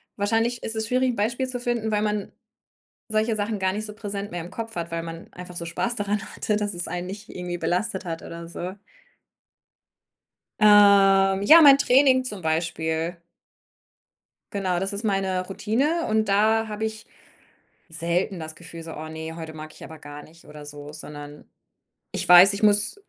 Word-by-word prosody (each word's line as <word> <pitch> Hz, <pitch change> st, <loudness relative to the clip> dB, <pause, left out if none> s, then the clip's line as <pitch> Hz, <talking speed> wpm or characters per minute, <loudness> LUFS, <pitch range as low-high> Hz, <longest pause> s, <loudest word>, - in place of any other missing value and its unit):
Wahrscheinlich 225 Hz, +3 st, 0 dB
ist 225 Hz, -, -4 dB
es 220 Hz, -1 st, -2 dB
schwierig, 255 Hz, +1 st, +1 dB
'n -, -, -6 dB
Beispiel 235 Hz, +5 st, -1 dB
zu 250 Hz, -1 st, -4 dB
finden, 235 Hz, -3 st, -2 dB
weil 210 Hz, 0 st, +1 dB
man 210 Hz, -1 st, -2 dB, 0.8 s
solche 215 Hz, +1 st, 0 dB
Sachen 210 Hz, 0 st, -2 dB
gar 190 Hz, 0 st, 0 dB
nicht 215 Hz, +2 st, -4 dB
so 210 Hz, -, -9 dB
präsent 205 Hz, -1 st, -5 dB
mehr 175 Hz, -, -4 dB
im 175 Hz, -, -10 dB
Kopf 225 Hz, -1 st, -6 dB
hat, 170 Hz, 0 st, -4 dB
weil 165 Hz, 0 st, -3 dB
man 165 Hz, 0 st, -9 dB
einfach 180 Hz, 0 st, -10 dB
so 170 Hz, -, -4 dB
Spaß 235 Hz, +8 st, -2 dB
daran 205 Hz, 0 st, -1 dB
hatte, 210 Hz, -, -1 dB
dass 205 Hz, -2 st, -2 dB
es 175 Hz, -, -4 dB
einen 175 Hz, +1 st, -4 dB
nicht 200 Hz, +2 st, -8 dB
irgendwie 180 Hz, -1 st, -5 dB
belastet 185 Hz, +4 st, -2 dB
hat 165 Hz, -1 st, -5 dB
oder 170 Hz, 0 st, -9 dB
so. 180 Hz, +2 st, -6 dB, 1.9 s
Ähm, 195 Hz, -2 st, +6 dB
ja, 320 Hz, +10 st, +9 dB
mein 280 Hz, -3 st, +9 dB
Training 260 Hz, -1 st, +4 dB
zum 210 Hz, -6 st, -5 dB
Beispiel. 160 Hz, +1 st, -2 dB, 1.3 s
Genau, 185 Hz, -3 st, -1 dB
das 195 Hz, +1 st, -3 dB
ist 200 Hz, +3 st, -4 dB
meine 195 Hz, -3 st, 0 dB
Routine 265 Hz, -, -1 dB
und 220 Hz, 0 st, +1 dB
da 220 Hz, +3 st, +3 dB
habe 210 Hz, 0 st, -5 dB
ich 220 Hz, 0 st, -6 dB, 0.8 s
selten 170 Hz, +3 st, -2 dB
das 160 Hz, 0 st, -7 dB
Gefühl 165 Hz, 0 st, -11 dB
so: 160 Hz, 0 st, -8 dB
„Oh 155 Hz, +1 st, -7 dB
ne, 160 Hz, +1 st, -7 dB
heute 160 Hz, -1 st, -7 dB
mag 155 Hz, 0 st, -9 dB
ich -, -, -13 dB
aber 160 Hz, -1 st, -11 dB
gar 145 Hz, 0 st, -10 dB
nicht“, 165 Hz, +3 st, -18 dB
oder 150 Hz, 0 st, -11 dB
so, 145 Hz, 0 st, -9 dB
sondern 150 Hz, -1 st, -10 dB, 0.6 s
ich -, -, -4 dB
weiß, 180 Hz, +3 st, +9 dB
ich 200 Hz, -, -5 dB
muss 205 Hz, -, +3 dB
195 Hz, 180 wpm, -24 LUFS, 170-215 Hz, 1.9 s, ja